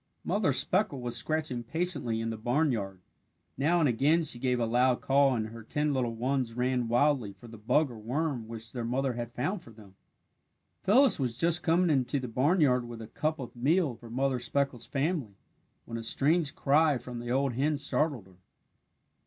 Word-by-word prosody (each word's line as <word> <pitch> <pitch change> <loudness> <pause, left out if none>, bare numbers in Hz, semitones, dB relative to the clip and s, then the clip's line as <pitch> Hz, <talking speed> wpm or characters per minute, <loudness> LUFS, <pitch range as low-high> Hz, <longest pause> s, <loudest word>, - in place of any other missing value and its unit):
Mother - - +1
Speckle 140 - +1
was 120 -1 -3
scratching 150 0 -1
patiently 125 -5 -2
in 115 0 -2
the - - -4
barnyard. 115 - -1 0.5
Now 160 +6 +2
and 155 - +3
again 145 +7 +2
she 135 -6 -2
gave 125 -1 0
a 115 - +1
loud 125 +2 +2
call 135 -1 +3
and 110 -2 -2
her 115 +1 -10
ten 150 +6 -1
little 120 -3 -1
ones 125 -1 -1
ran 125 -1 0
wildly 120 -3 +2
for 100 +5 -15
the 115 -1 -11
bug 140 +6 +2
or 115 - -10
worm 125 +1 -2
which 115 0 -8
their 120 -2 -4
mother 130 +3 -1
had 120 0 -5
found 175 - -2
for - - -15
them. 105 -4 -15 0.9
Phyllis 250 - +4
was 120 -3 -2
just 170 +5 +2
coming 170 +1 +2
into 135 0 +1
the 130 - -5
barnyard 130 0 +2
with 120 -1 -8
a 110 - -8
cup 155 +6 -2
of 125 -3 -8
meal 150 +4 +2
for 115 0 -13
Mother 130 +2 0
Speckle's 125 -1 -2
family, 140 - -2 0.5
when 115 0 -5
a - - -5
strange 150 +6 +2
cry 150 0 +3
from 120 0 -7
the 120 0 -6
old 135 +1 +1
hen 145 +5 0
startled 140 -5 -1
her. 95 -2 -20
125 Hz, 190 wpm, -29 LUFS, 115-150 Hz, 0.9 s, Phyllis